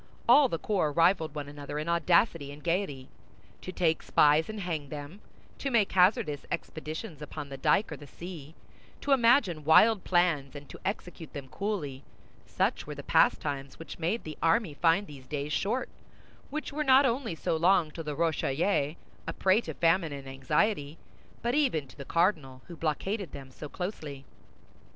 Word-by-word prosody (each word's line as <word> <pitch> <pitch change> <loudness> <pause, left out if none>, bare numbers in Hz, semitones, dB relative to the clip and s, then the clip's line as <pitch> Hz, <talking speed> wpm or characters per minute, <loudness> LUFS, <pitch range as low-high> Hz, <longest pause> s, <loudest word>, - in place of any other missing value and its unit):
All 265 +3 +7
the 165 - -1
corps 180 -5 0
rivaled 165 -1 +2
one 145 -1 -4
another 145 0 -7
in 155 +2 -3
audacity 170 -3 +2
and 145 +1 -12
gaiety. 165 -7 -1 0.5
To 185 - -6
take 165 -3 +1
spies 150 +3 +4
and 215 -1 -5
hang 160 -6 -3
them, 150 +7 -8 0.4
to 275 - -2
make 225 -6 +2
hazardous 180 - +3
expeditions 155 +1 -5
upon 150 -1 -7
the 135 - -7
dyke 195 +9 +2
or 155 - -5
the 145 - -12
sea, 165 -2 -9 0.5
to 285 - -2
imagine 230 - +4
wild 195 +7 +5
plans, 165 -6 +1
and 145 0 -9
to - - -10
execute 180 -5 -5
them 140 -2 -7
coolly—such 150 -10 -4
were - - -6
the - - -8
pastimes 140 -1 +1
which 165 - -9
made 175 +8 -1
the 155 -1 -8
army 165 +1 +2
find 170 +6 +2
these 135 -5 -12
days 145 0 -3
short 230 +10 0 0.6
which 305 0 -5
were 300 +1 -1
not 270 0 +6
only 235 -6 -1
so 160 - -1
long 170 -1 +3
to 165 - -7
the 150 -2 -4
Rochellais, 155 0 0 0.3
a - - -2
prey 190 +4 +3
to - - -7
famine 165 -1 +2
and 140 -1 -8
anxiety, 145 +4 0 0.5
but 240 +1 0
even 255 - +1
to 130 - -16
the 140 - -9
cardinal, 155 -8 0
who 175 - -10
blockaded 180 +5 -2
them 135 -1 -9
so 150 +3 -9
closely. 150 -8 -6
165 Hz, 170 wpm, -29 LUFS, 145-195 Hz, 0.6 s, All